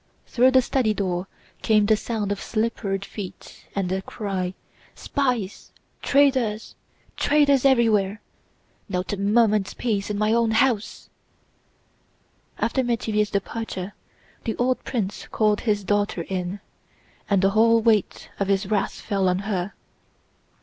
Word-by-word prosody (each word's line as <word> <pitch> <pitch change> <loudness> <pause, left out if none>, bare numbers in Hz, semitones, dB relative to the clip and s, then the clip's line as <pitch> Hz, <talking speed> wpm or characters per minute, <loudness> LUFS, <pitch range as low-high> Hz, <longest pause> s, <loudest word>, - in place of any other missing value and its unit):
Through 250 +2 +4
the 260 -1 +4
study 240 -5 +1
door 185 -2 -2 0.3
came 215 -2 +3
the 215 +1 +4
sound 215 -2 -3
of 200 - -3
slippered 215 -3 -2
feet 200 -3 -9
and 195 -2 0
the 190 +1 -1
cry: 190 -3 -4 0.4
"Spies, 250 -9 -2 0.3
traitors, 260 -6 +2 0.4
traitors 285 -2 +3
everywhere! 220 -6 +3 0.7
Not 180 +2 -2
a - - -2
moment's 210 0 +2
peace 210 -5 -1
in 210 - -2
my 215 +1 +2
own 230 -1 +3
house!" 235 -5 0 1.5
After 235 +4 0
Métivier's 220 -4 0
departure 200 -1 -4 0.5
the 225 - -2
old 255 +1 0
prince 205 -6 -3
called 210 -1 +1
his 205 -1 +1
daughter 205 -3 0
in, 185 +2 -4 0.7
and 200 -2 +2
the 195 - +4
whole 230 +2 +5
weight 220 -3 +1
of 200 - 0
his 195 0 +1
wrath 205 - +1
fell 195 -3 -1
on 180 - +1
her. 195 -1 -2
210 Hz, 130 wpm, -24 LUFS, 195-230 Hz, 1.5 s, whole